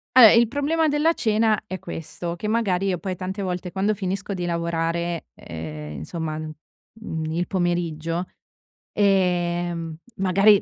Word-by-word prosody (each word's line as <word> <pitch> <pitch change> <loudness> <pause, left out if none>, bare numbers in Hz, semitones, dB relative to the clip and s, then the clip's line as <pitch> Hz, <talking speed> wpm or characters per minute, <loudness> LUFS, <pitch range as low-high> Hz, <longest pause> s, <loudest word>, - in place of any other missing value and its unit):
Vabbè, 245 -4 +11
il 235 0 +6
problema 295 +6 +1
della 300 +3 +3
cena 220 -4 +2
è 185 -2 -5
questo: 170 +2 -5
che 210 - -4
magari 200 -4 +1
io 185 -2 +1
poi 190 -2 -3
tante 190 +3 -4
volte, 180 -1 -3
quando 200 +2 +1
finisco 195 0 -3
di 180 -2 -3
lavorare, 170 0 -1
ehm, 75 -2 -7
insomma, 155 - -4
mhmm, 155 +3 -8
il 175 +2 -1
pomeriggio, 175 -2 -1 0.7
ehm, 175 -4 +1 0.2
magari 195 +2 +5
180 Hz, 135 wpm, -24 LUFS, 170-205 Hz, 0.7 s, Vabbè